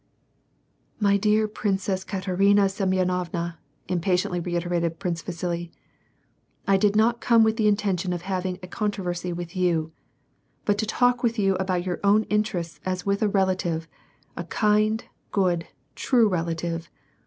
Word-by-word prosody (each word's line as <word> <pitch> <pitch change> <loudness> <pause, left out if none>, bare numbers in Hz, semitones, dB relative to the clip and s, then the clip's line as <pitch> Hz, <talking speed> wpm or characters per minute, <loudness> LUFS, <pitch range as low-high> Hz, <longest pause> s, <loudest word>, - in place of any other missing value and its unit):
"My 200 -2 +3
dear 215 +2 +2
Princess 195 -2 -1
Katerina 195 +1 +2
Semyonovna," 180 -3 -1 0.3
impatiently 180 0 0
reiterated 170 -1 -1
Prince 175 -3 -2
Vasili, 170 -1 -4 0.5
" - - -41
I 195 - +5
did 205 +1 +3
not 235 +3 +3
come 230 -2 +5
with 220 0 +2
the 215 -3 +3
intention 195 -3 +1
of 175 -1 -3
having 185 -1 -2
a - - -6
controversy 180 -4 -2
with 175 +1 -6
you, 170 -3 +1 0.7
but 205 -1 +1
to 220 - 0
talk 245 +2 +2
with 235 -1 0
you 195 -2 +3
about 185 -1 -1
your 180 -1 -2
own 205 +2 +4
interests 200 -6 -1
as 185 -1 -3
with 200 0 0
a 215 - +3
relative, 185 -4 0 0.5
a 175 - -4
kind, 215 +4 +2 0.3
good, 180 -4 +1 0.3
true 235 - +3
rela 170 -4 -1
tive. 165 -1 -4
185 Hz, 145 wpm, -25 LUFS, 175-210 Hz, 0.7 s, I